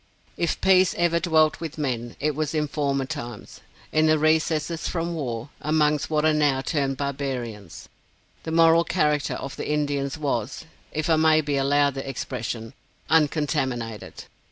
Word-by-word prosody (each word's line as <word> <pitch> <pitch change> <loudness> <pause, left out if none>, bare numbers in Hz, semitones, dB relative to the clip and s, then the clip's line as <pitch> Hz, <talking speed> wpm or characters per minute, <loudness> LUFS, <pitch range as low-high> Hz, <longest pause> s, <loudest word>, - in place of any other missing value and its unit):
If 170 -2 -1
peace 190 -1 +4
ever 170 -1 +2
dwelt 160 -3 +3
with 160 -3 -6
men, 120 -5 -3
it 150 +1 0
was 155 +1 -2
in 150 -1 +1
former 140 -2 -1
times, 120 -6 -7 0.3
in 155 0 +3
the 155 0 +4
recesses 155 +1 +1
from 170 0 -2
war, 125 -5 -4
amongst 150 -1 +1
what 155 -1 +1
are 155 - +4
now 145 -3 +2
termed 135 -2 -1
barbarians. 130 - -5 0.5
The - - -6
moral 165 0 +5
character 150 -5 0
of 135 - -6
the - - -4
Indians 145 -1 -1
was 140 -2 -3 0.3
(if 155 0 -2
I 160 -2 +3
may 155 0 +5
be 145 -1 -2
allowed 140 +1 +2
the 135 0 -5
expression) 120 -3 -5 0.4
uncontaminated. 140 - 0
150 Hz, 155 wpm, -24 LUFS, 135-155 Hz, 0.5 s, moral